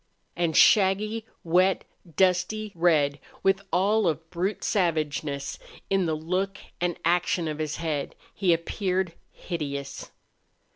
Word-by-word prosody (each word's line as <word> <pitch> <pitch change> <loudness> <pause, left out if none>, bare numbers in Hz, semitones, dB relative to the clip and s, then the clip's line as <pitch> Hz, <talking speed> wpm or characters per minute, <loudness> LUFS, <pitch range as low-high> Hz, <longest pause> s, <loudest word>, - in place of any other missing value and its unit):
And 170 -2 +1
shaggy, 210 +3 +4 0.2
wet, 180 +3 +3 0.3
dusty 190 +3 +1
red, 155 -4 +2 0.2
with 195 0 +3
all 205 +2 +3
of 160 0 -1
brute 185 +4 -2
savageness 155 -6 -1 0.3
in 190 -3 +2
the 160 - 0
look 185 +5 -2 0.2
and 175 -1 0
action 175 0 +2
of 155 0 -4
his 155 0 -2
head, 155 -4 -3 0.2
he 190 -3 +2
appeared 180 +1 0 0.2
hideous. 140 -5 -5
175 Hz, 115 wpm, -26 LUFS, 160-195 Hz, 0.3 s, shaggy